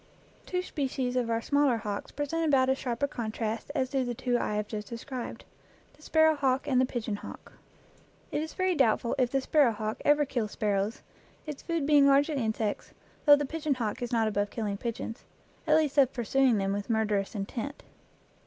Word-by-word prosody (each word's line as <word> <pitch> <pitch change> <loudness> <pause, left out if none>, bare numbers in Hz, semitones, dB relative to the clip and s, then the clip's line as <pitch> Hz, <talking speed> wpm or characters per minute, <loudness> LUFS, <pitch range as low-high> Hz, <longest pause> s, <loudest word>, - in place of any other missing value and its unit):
Two 360 0 -1
species 265 -6 -2
of 245 -2 0
our 230 0 0
smaller 285 -4 +3
hawks 205 -2 -4
present 295 +3 -2
about 270 -4 +3
as 265 - +2
sharp 245 0 -3
a - - +4
contrast 225 -2 -4
as 260 -1 0
do 270 -2 +1
the 245 -1 -3
two 245 +1 -1
I 210 - 0
have 210 0 -1
just 210 -1 -5
de 235 - -5
scribed 250 0 -7 0.5
the - - -23
sparrow 315 0 +4
hawk 270 -2 0
and 255 -2 +3
the 260 - +2
pigeon 225 -4 -3
hawk. - - -11 0.8
It 295 - -1
is 315 - -6
very 370 -1 +1
doubtful 235 -5 +2
if 250 -2 +3
the 270 +1 0
sparrow 280 -2 +4
hawk 215 +1 -4
ever 295 0 +4
kills 235 -6 -3
sparrows, 205 +1 -1 0.4
its 300 -3 -6
food 335 -4 -2
being 290 -1 +6
largely 285 +2 +3
insects, 220 -1 -2 0.3
though 290 -1 +9
the 290 0 -1
pigeon 305 0 -1
hawk 225 -3 -3
is 245 - -3
not 225 -2 +2
above 205 -1 0
killing 210 -3 -3
pigeons 230 0 -5 0.4
at 305 0 +5
least 300 -2 +2
of 265 -2 +5
pursuing 250 0 +2
them 195 0 0
with 205 +2 -4
murderous 215 -2 0
intent. 230 +8 -5
250 Hz, 200 wpm, -29 LUFS, 220-285 Hz, 0.8 s, though